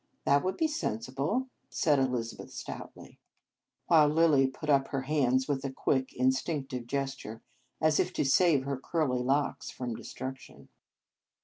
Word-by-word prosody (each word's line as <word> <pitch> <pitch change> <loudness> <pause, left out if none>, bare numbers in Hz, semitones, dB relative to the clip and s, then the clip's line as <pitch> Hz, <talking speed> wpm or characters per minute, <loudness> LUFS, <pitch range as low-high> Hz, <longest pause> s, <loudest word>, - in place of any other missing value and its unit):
"That 140 0 +4
would 185 +1 -1
be 320 - +2
sensible," 140 - -2 0.2
said 150 -3 +2
Elizabeth 125 -3 -2
stoutly, - - -9 0.7
while 155 -3 +6
Lilly 150 -3 +4
put 135 +4 -8
up 140 -2 +3
her 135 - -2
hands 130 -3 +1
with 140 -3 -1
a 135 - -2
quick, 130 0 0
instinctive 130 -1 -1
gesture, 135 -5 -4 0.4
as 155 -1 +3
if - - +1
to - - 0
save 145 0 +4
her 140 0 -2
curly 135 -2 0
locks 140 +3 0
from 125 -2 -5
destruction. 130 +3 -8
135 Hz, 140 wpm, -30 LUFS, 130-150 Hz, 0.7 s, while